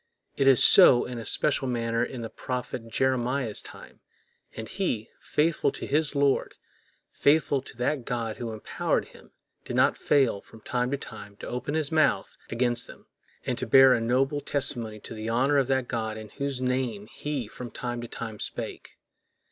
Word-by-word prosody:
It 135 Hz, -, +1 dB
was 135 Hz, -3 st, +7 dB
so 135 Hz, -10 st, +8 dB
in 120 Hz, -1 st, -6 dB
a 115 Hz, -, -7 dB
special 140 Hz, -2 st, +1 dB
manner 115 Hz, -1 st, 0 dB
in 125 Hz, -1 st, -5 dB
the 115 Hz, -, -5 dB
prophet 125 Hz, -2 st, -5 dB
Jeremiah's 125 Hz, -1 st, 0 dB
time; -, -, -13 dB, 0.6 s
and 110 Hz, 0 st, -6 dB
he, 120 Hz, -, -3 dB
faithful 150 Hz, -2 st, +1 dB
to -, -, -6 dB
his 150 Hz, +1 st, 0 dB
Lord, 140 Hz, -1 st, +1 dB, 0.6 s
faithful 145 Hz, -2 st, +2 dB
to 130 Hz, -, -13 dB
that 125 Hz, +2 st, -1 dB
God 115 Hz, -2 st, -3 dB
who 115 Hz, -2 st, -5 dB
employed 110 Hz, -1 st, -2 dB
him, -, -, -17 dB, 0.3 s
did -, -, -5 dB
not -, -, +4 dB
fail 130 Hz, -8 st, +2 dB
from 110 Hz, -, -17 dB
time 125 Hz, +2 st, -1 dB
to 140 Hz, -, -1 dB
time 105 Hz, -6 st, -10 dB
to -, -, -9 dB
open 125 Hz, +5 st, -3 dB
his 155 Hz, -3 st, +1 dB
mouth 155 Hz, -2 st, +2 dB
against 120 Hz, 0 st, +1 dB
them, -, -, -14 dB, 0.4 s
and -, -, -2 dB
to -, -, -3 dB
bear 135 Hz, +2 st, +7 dB
a 115 Hz, -, +1 dB
noble 135 Hz, +5 st, +1 dB
testimony 120 Hz, -7 st, -1 dB
to -, -, -9 dB
the 110 Hz, 0 st, -5 dB
honor 135 Hz, +5 st, +3 dB
of 135 Hz, -, +1 dB
that 130 Hz, -2 st, 0 dB
God 110 Hz, -2 st, -3 dB
in 110 Hz, -1 st, -9 dB
whose 140 Hz, -2 st, -4 dB
name 125 Hz, -5 st, -1 dB
he 140 Hz, +1 st, -5 dB
from 120 Hz, +3 st, -8 dB
time 120 Hz, 0 st, -5 dB
to 120 Hz, -, -6 dB
time 110 Hz, -2 st, -7 dB
spake. -, -, -6 dB
125 Hz, 180 wpm, -27 LUFS, 115-140 Hz, 0.6 s, so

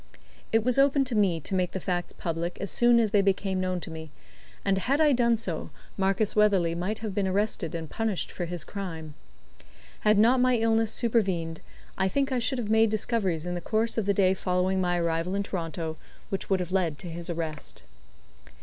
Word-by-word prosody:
It 225 Hz, 0 st, +3 dB
was 250 Hz, +2 st, +2 dB
open 275 Hz, 0 st, +4 dB
to 255 Hz, -, -3 dB
me 190 Hz, -6 st, +2 dB
to 170 Hz, -, -4 dB
make 180 Hz, -2 st, 0 dB
the 190 Hz, -, -2 dB
facts 175 Hz, -1 st, -2 dB
public 170 Hz, +1 st, -4 dB
as 200 Hz, -, -4 dB
soon 240 Hz, 0 st, +5 dB
as 220 Hz, -3 st, +1 dB
they 205 Hz, -2 st, +4 dB
became 195 Hz, -1 st, 0 dB
known 185 Hz, -1 st, -1 dB
to 165 Hz, -, -6 dB
me, 160 Hz, -1 st, -8 dB, 0.6 s
and 195 Hz, -1 st, +2 dB
had 275 Hz, +9 st, +1 dB
I 305 Hz, -2 st, +5 dB
done 235 Hz, -3 st, +3 dB
so, 185 Hz, -7 st, -4 dB, 0.3 s
Marcus 195 Hz, +2 st, 0 dB
Weatherley 195 Hz, -6 st, +3 dB
might 180 Hz, +6 st, -2 dB
have 210 Hz, -, -3 dB
been 195 Hz, -1 st, 0 dB
arrested 190 Hz, -3 st, 0 dB
and 165 Hz, -1 st, -4 dB
punished 220 Hz, +3 st, -2 dB
for 175 Hz, -, -4 dB
his 175 Hz, 0 st, -4 dB
crime. 165 Hz, -6 st, -6 dB, 0.9 s
Had 210 Hz, 0 st, +3 dB
not 235 Hz, +5 st, +5 dB
my 255 Hz, 0 st, +4 dB
illness 225 Hz, -1 st, +2 dB
supervened, 190 Hz, -9 st, 0 dB, 0.4 s
I 190 Hz, -, +3 dB
think 275 Hz, +7 st, 0 dB
I 255 Hz, -, +1 dB
should 255 Hz, +3 st, -1 dB
have 220 Hz, -3 st, -2 dB
made 220 Hz, 0 st, +5 dB
discoveries 200 Hz, -6 st, -1 dB
in 175 Hz, -, -3 dB
the 175 Hz, -, -3 dB
course 220 Hz, +5 st, 0 dB
of 220 Hz, -3 st, -1 dB
the 200 Hz, -, +4 dB
day 190 Hz, -1 st, +4 dB
following 185 Hz, 0 st, 0 dB
my 175 Hz, -1 st, +1 dB
arrival 170 Hz, +2 st, -1 dB
in 200 Hz, -, 0 dB
Toronto 165 Hz, -4 st, -4 dB, 0.3 s
which 195 Hz, -, -4 dB
would 190 Hz, -2 st, +2 dB
have 180 Hz, 0 st, -5 dB
led 175 Hz, -6 st, 0 dB
to 175 Hz, -, -8 dB
his 170 Hz, +1 st, -6 dB
arrest. 160 Hz, -, -5 dB
190 Hz, 205 wpm, -27 LUFS, 175-220 Hz, 0.9 s, soon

